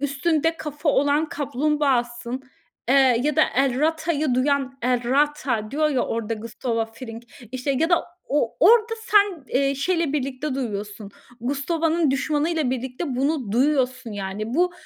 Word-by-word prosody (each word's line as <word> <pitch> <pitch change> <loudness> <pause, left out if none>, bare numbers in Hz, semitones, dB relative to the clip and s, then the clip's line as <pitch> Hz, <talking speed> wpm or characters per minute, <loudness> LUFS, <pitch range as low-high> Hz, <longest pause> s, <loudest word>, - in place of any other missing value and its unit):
üstünde 315 +3 0
kafa 300 0 -4
olan 290 +2 +2
kaplumbağasın, 260 -3 -1 0.5
eee, 260 - +4 0.3
ya 300 -1 0
da - - +6
El 265 -1 +2
rata'yı 315 -3 +1
duyan 270 0 0
El 245 -1 +1
rata 270 -6 +1
diyor 305 +2 +1
ya 270 -4 0
orada 225 0 -2
Gustavo 230 +1 -3
Fring 230 -1 -9 0.3
işte 260 +2 -2
ya 325 +2 +2
da 345 - +3 0.2
o 285 -5 0
orada 450 +5 +5
sen, 405 - +3
eee, 275 +1 +1
şeyle 330 +1 0
birlikte 275 0 -2
duyuyorsun, 210 -4 -5 0.3
Gustavo'nun 315 +4 0
düşmanıyla 295 +1 0
birlikte 260 +2 -3
bunu 270 -5 -1
duyuyorsun 255 -2 +1
yani 205 +3 -4
bu 355 +3 +2
275 Hz, 135 wpm, -23 LUFS, 245-305 Hz, 0.5 s, da